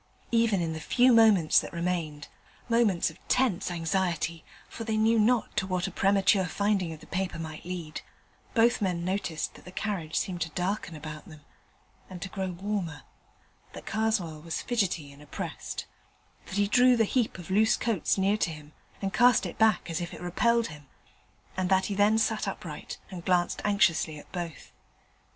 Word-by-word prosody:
Even 230 -5 +3
in 160 -1 -2
the 160 - -5
few 250 +9 +4
moments 215 -8 +6
that - - -6
remained 170 -4 -3 0.4
moments 230 -8 +2
of - - -19
tense 230 -9 +1
anxiety, 170 -1 -1 0.2
for 230 - -7
they 220 -1 -1
knew 225 +1 +4
not 230 +1 +2
to 200 -3 0
what 180 -2 -1
a 195 - -3
premature 195 0 +3
finding 195 -1 0
of 160 -1 -9
the - - -12
paper 185 -2 -3
might 160 -1 -7
lead 175 -4 -5 0.5
both 235 0 +4
men 180 -3 -1
noticed 185 -4 -2
that - - -15
the 180 - -11
carriage 185 -5 -3
seemed 180 -2 -1
to 165 - -1
darken 180 -2 -2
about 155 0 -8
them 155 -2 -13 0.7
and 185 - -8
to 195 - -5
grow 190 -1 -3
warmer; 180 -5 -4 0.7
that - - -9
Karswell 200 -8 -1
was 165 0 -4
fidgety 185 -11 -1
and 140 +1 -15
oppressed; 150 - -6 0.6
that - - -6
he 205 0 +2
drew 250 +3 +5
the 225 - +4
heap 235 -1 0
of 180 0 -9
loose 215 +3 +4
coats 220 -7 0
near 195 +2 +2
to 195 - 0
him 150 -2 -10 0.3
and 195 -1 -1
cast 245 -1 +5
it - - -7
back 220 -4 +3
as 165 0 -3
if 175 - -5
it - - -11
repelled 230 +6 +1
him; 150 -2 -12 0.7
and 185 -1 -1
that 190 0 +3
he 205 - -2
then 205 +2 +4
sat 220 - 0
upright - - -6
and 180 -2 -7
glanced 180 -1 +1
anxiously 170 -7 +2
at 145 - -14
both. 170 -6 -6
185 Hz, 180 wpm, -28 LUFS, 165-215 Hz, 0.7 s, moments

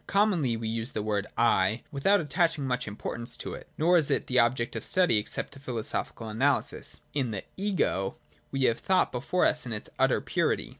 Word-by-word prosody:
Commonly 180 - +2
we 115 0 -4
use 115 +2 -2
the 105 - -2
word 105 -1 -1
' - - -36 0.2
I 100 +5 0
' - - -38
without 180 +8 +3
attaching 160 -1 +1
much 125 -2 -1
importance 115 +3 -4
to - - -5
it, - - -9
nor 175 +3 +4
is 155 -4 +2
it 140 - 0
an 130 - +3
object 120 +1 +1
of - - -3
study 180 -13 +3
except 105 - -4
to 135 - -12
philosophical 115 -3 -3
analysis. 130 +7 0
In 135 -4 0
the 105 -3 -4
' - - -38
Ego,' 95 - 0 0.3
we 135 -1 -1
have 115 -2 +3
thought 185 -1 +2
before 135 +9 0
us 150 - +1
in 120 - -3
its 105 - -5
utter - - +3
purity. - - 0
125 Hz, 210 wpm, -28 LUFS, 115-150 Hz, 0.3 s, nor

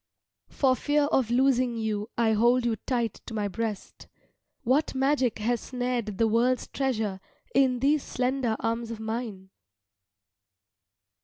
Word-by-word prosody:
For 260 -2 +2
fear 295 +2 +1
of 250 -4 +2
losing 250 -1 +2
you 215 -1 -2
I 230 -2 +3
hold 240 +3 +3
you 235 -2 +1
tight 235 -1 -2
to 225 - -6
my 210 -1 0
breast. 215 0 -5 0.6
What 270 +4 +1
magic 265 -2 +1
has 230 +2 0
snared 245 -5 -3
the 225 - +3
world's 240 +3 +2
treasure 220 -8 -2 0.3
in 255 -1 +3
these 290 +2 +3
slender 250 -3 -1
arms 230 0 -2
of 230 -1 -6
mine?" 220 -4 -5
235 Hz, 135 wpm, -27 LUFS, 220-255 Hz, 0.6 s, I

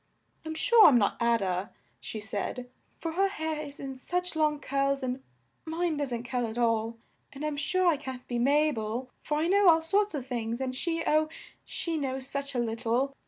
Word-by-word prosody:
"I'm 315 0 -5
sure 460 +7 +7
I'm 255 - +7
not 205 -3 +2
A 235 0 +4
da," 190 -1 -1 0.3
she 175 - -6
said, 220 +4 -4 0.3
"for 330 - -3
her 385 +4 +2
hair 315 -6 -3
is 285 -1 -9
in 270 -1 -6
such 360 +5 -2
long 305 -2 +2
curls 275 0 0
and 255 +1 -2 0.4
mine 330 0 -1
doesn't 255 -5 -2
curl 245 -1 -1
at 220 +1 -6
all; 230 -1 +1 0.3
and 280 +2 -6
I'm 305 -1 -1
sure 365 +6 0
I 335 -4 +4
can't 260 -3 -7
be 240 -1 -2
Ma 295 +5 +4
bel, 230 +2 -4
for 295 - -1
I 310 - +1
know 395 0 +6
all 325 -1 +5
sorts 400 +2 +2
of 270 -4 -4
things, 235 -2 -3
and 260 -1 -2
she, 330 +4 -1
oh! 310 0 +3 0.3
she 335 -2 -3
knows 265 -2 -2
such 280 0 -2
a - - +1
lit 230 -1 -1
tle! 250 +4 +1
275 Hz, 210 wpm, -29 LUFS, 240-315 Hz, 0.4 s, sure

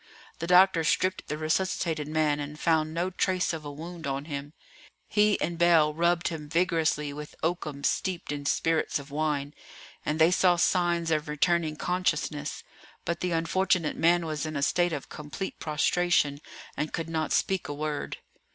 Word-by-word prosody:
The 170 - -3
doctor 180 -1 +6
stripped 185 +4 +1
the 150 - -3
resuscitated 155 -1 -1
man 155 -1 +1
and 145 +1 -6
found 160 -2 +2
no 175 +3 -1
trace 185 -1 0
of 160 -2 -5
a 145 - -6
wound 165 +1 -7
on 135 +1 -2
him. 145 -1 -6 0.5
He 210 -1 +3
and 170 0 -2
Bell 165 -3 +5
rubbed 170 +1 +1
him 155 -3 -7
vigorously 160 -3 +1
with 150 +1 -8
oakum 155 -4 -2
steeped 180 0 -1
in 145 -1 -4
spirits 165 +1 +1
of 140 0 -10
wine, 145 -1 -1 0.5
and 150 - -1
they 160 +2 +5
saw 180 -1 +4
signs 170 -1 +1
of 155 -1 0
returning 155 +1 +1
consciousness; 155 -4 -1 0.4
but 170 -1 -2
the 180 - -1
unfortunate 165 0 +1
man 170 +1 +3
was 155 -2 -3
in 155 -1 -4
a 140 - -1
state 175 +4 +2
of 145 -4 -4
complete 150 +6 -6
prostration, 155 -1 +1 0.3
and 150 - -3
could 165 -2 -3
not 160 -1 -2
speak 190 -2 +1
a 145 - -4
word. 150 0 -3
160 Hz, 170 wpm, -28 LUFS, 150-175 Hz, 0.5 s, doctor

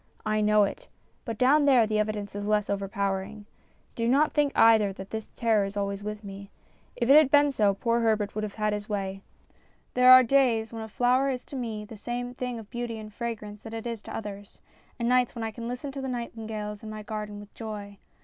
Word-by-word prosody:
I 215 0 +1
know 210 0 +4
it; 200 - -4 0.4
but 230 -4 -4
down 285 +5 +4
there 255 -5 +5
the 215 0 0
evidence 210 -1 -2
is 205 0 -4
less 210 -1 +1
overpowering. 200 +1 -3 0.5
Do 230 -1 -1
not 280 +5 +3
think 295 -2 +2
either 220 -3 +5
that 190 0 -10
this 220 -1 -5
terror 225 -3 +2
is 195 +1 -5
always 200 0 -2
with 210 +1 -5
me. 200 0 -9 0.5
If 235 - -1
it 275 - +7
had 305 -3 +7
been 290 0 +5
so, 205 -6 +2
poor 235 +3 +1
Herbert 215 -3 +1
would 215 - -3
have 210 -2 -5
had 215 -1 0
his 210 0 -5
way. 195 -2 -3 0.7
There 250 0 +6
are 255 0 +10
days 235 -3 +2
when 225 - -5
a 220 - -6
flower 250 +5 +2
is 255 -2 -3
to - - -9
me 225 -4 -4
the 215 +1 -11
same 245 +3 -4
thing 250 -1 -4
of 220 -2 -11
beauty 240 -2 -4
and 215 -1 -9
fragrance 210 -3 -5
that 225 0 -8
it 225 - -6
is 230 -3 -4
to - - -8
others, 205 -2 -8 0.4
and 235 -2 -1
nights 250 0 +2
when 230 - -4
I 225 - -2
can 235 +1 -7
listen 250 +4 -5
to 270 0 -6
the 265 - -4
nightin 235 -3 -5
gales 210 -1 -5
in 220 - -8
my 215 0 -7
garden 210 -1 -5
with 205 0 -13
joy. 205 -3 -7
220 Hz, 230 wpm, -27 LUFS, 210-245 Hz, 0.7 s, are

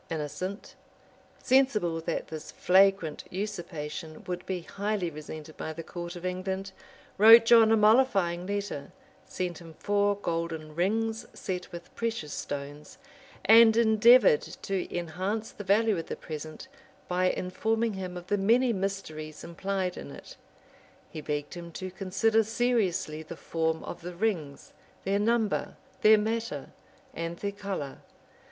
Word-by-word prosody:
Innocent, 170 - -5 0.7
sensible 215 -11 +2
that 165 +1 -3
this 155 -1 -7
flagrant 190 -4 +3
usurpation 165 -6 -5
would 180 -1 -4
be 185 -2 -2
highly 200 0 -2
resented 155 +1 -9
by 160 - -4
the 165 +1 -7
court 175 +1 -7
of 175 +1 -8
England, 190 +1 -3 0.5
wrote 225 +2 +9
John 225 -1 +7
a 225 - +5
mollifying 210 -6 +3
letter; 200 -8 -4 0.4
sent 180 -2 -4
him 165 -2 -12
four 205 +2 +1
golden 165 -4 -3
rings 225 +7 -1
set 180 -1 -5
with 170 0 -10
precious 225 -11 -3
stones; 145 +1 -6 0.5
and 225 0 +8
endeavored 225 -5 +6
to 190 -2 -4
enhance 185 +6 -3
the 205 - -9
value 205 0 +3
of 165 - -6
the - - -4
present, 155 - -8 0.4
by 180 +1 +1
informing 220 +6 -1
him 185 -2 -5
of 175 - -8
the 205 +2 0
many 235 +5 +3
mysteries 185 -6 -4
implied 185 +1 -3
in - - -7
it. - - -11 0.8
He 155 - -6
begged 145 0 -3
him 170 -1 -8
to 185 +2 -6
consider 195 +4 +1
seriously 210 -9 0
the 160 +1 -9
form 160 -1 -1
of - - -7
the 175 +1 -7
rings, 170 -8 -2 0.3
their 200 +1 +1
number, 220 -1 0 0.3
their 215 0 +7
matter, 225 +2 -3 0.4
and 165 +1 -4
their 200 +2 -3
color. 195 -9 -5
185 Hz, 140 wpm, -28 LUFS, 165-215 Hz, 0.8 s, wrote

